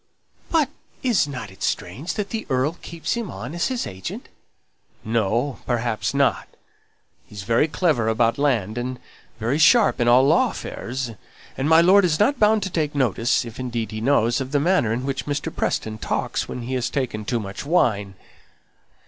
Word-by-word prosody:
"But 310 -5 +2 0.3
isn't 200 - +1 0.2
it 95 - -18
strange 160 +7 -3
that 205 -2 -3
the 225 -1 -4
earl 135 +6 0
keeps 165 -1 -4
him 235 -5 -3
on 120 +9 -7
as 175 - 0
his 255 -2 -2
agent?" 95 -1 -7 0.8
"No! 115 +4 0
perhaps 120 -1 -1
not. 140 0 +2 0.8
He's 100 -2 -8
very 115 - +2
clever 155 -8 +1
about 115 +2 +2
land, 120 -6 +1
and 125 +1 -4 0.4
very 120 +7 0
sharp 195 - +5
in 120 - +2
all 125 +2 +6
law 165 - +4
affairs; 125 - -5 0.4
and 135 +3 -1
my 160 +1 +7
lord 190 +4 +6
isn't 205 - +2
bound 215 -1 +4
to 190 - -4
take 150 -3 -1
notice 120 -3 +1
if 115 +1 -9
indeed 120 -3 -3
he 110 0 -5
knows 120 -1 +2
of 130 0 -5
the 145 - +3
manner 160 - +2
in 120 +3 -2
which 135 0 -3
Mr. 145 +2 -3
Preston 110 0 -2
talks - - -2
when 125 - -5
he 125 +3 -4
has 125 -2 -1
taken 125 -7 -2
too 120 +3 -1
much 100 +1 -6
wine." 105 - +1
130 Hz, 175 wpm, -23 LUFS, 115-165 Hz, 0.8 s, my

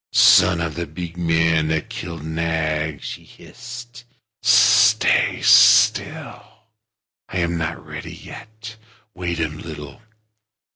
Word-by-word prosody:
"Son 90 -2 +5
of 80 -2 -3
the 85 +1 -5
big 85 +2 -8
man 80 -2 +1
that 80 -1 -2
killed 85 -3 -8
Nag," 80 -2 -3
she - - -8
hissed, 120 -1 -12 0.4
"stay 105 -2 +3
still. - - +4 0.9
I - - -5
am 85 -1 -1
not 80 -1 -5
ready - - -9
yet. 110 0 -12 0.4
Wait 85 -2 -5
a 80 - 0
little. 75 0 -10
85 Hz, 110 wpm, -20 LUFS, 80-95 Hz, 0.9 s, Son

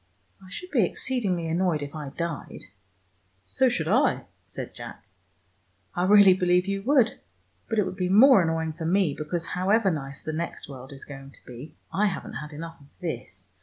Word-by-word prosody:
I 185 - -13
should 360 - -7
be 240 -8 +4
exceedingly 185 -4 -1
annoyed 165 -2 +1
if 145 - -7
I 150 -3 -6
died 165 +2 -5 0.5
" 95 +1 -41
"So 260 -1 +6
should 170 -10 -1
I," 245 - +3 0.2
said - - -6
Jack. - - -10 0.9
"I 175 - 0
really 200 -1 +8
believe 180 -1 +2
you 195 0 -2
would. 250 0 +3 0.5
But 225 - -1
it 210 - +3
would 185 - -5
be 180 -2 0
more 225 +3 +7
annoying 160 -1 -1
for 165 +1 -6
me, 180 -3 +2
because 165 +2 -3
however 195 +4 +2
nice 140 -3 -5
the 155 - -5
next 170 +2 -4
world 130 -1 -10
is 135 0 -10
going 135 -1 -10
to - - -17
be, 125 +5 -10 0.2
I 210 +2 +3
haven't 185 - -4
had 150 0 -8
enough 165 +1 -8
of 140 - -17
this. 120 - -6
170 Hz, 190 wpm, -26 LUFS, 150-195 Hz, 0.9 s, really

